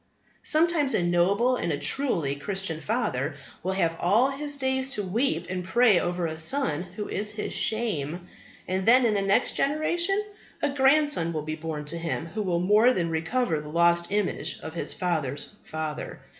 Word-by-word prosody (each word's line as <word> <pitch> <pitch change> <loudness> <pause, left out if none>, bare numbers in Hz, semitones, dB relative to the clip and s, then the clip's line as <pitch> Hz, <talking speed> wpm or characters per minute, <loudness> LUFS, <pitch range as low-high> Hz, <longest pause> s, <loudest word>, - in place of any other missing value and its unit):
Sometimes 310 -3 +2
a 175 - +1
noble 195 +8 +2
and 170 - -2
a 145 - -1
truly 160 - 0
Christian 180 0 -3
father 155 - -1 0.3
will 190 +2 -1
have 170 -4 0
all 220 +10 +3
his 290 +1 -4
days 265 -1 0
to 205 - -2
weep 230 +10 0
and 180 0 -3
pray 210 +1 +4
over 175 0 -2
a 160 -1 -4
son 160 - +2
who 210 - -4
is 210 +1 -2
his 210 - -4
shame; 180 -7 -2 0.4
and 185 +2 -2
then, 250 +2 +6
in 225 - +2
the 200 - +1
next 195 +5 +2
generation, 340 +7 +1 0.4
a 290 - +2
grandson 280 - +3
will 155 -2 -3
be 155 +1 -4
born 155 -2 -5
to 170 +3 -4
him 165 -1 -3
who 195 +6 -5
will 180 -4 0
more 210 +7 +4
than 170 -5 -1
recover 160 +1 0
the 150 - -9
lost 170 +2 +3
image 205 -2 -1
of 160 - -7
his 170 - -3
father's 155 -4 -2
father. 155 -1 -5
190 Hz, 180 wpm, -26 LUFS, 165-250 Hz, 0.4 s, then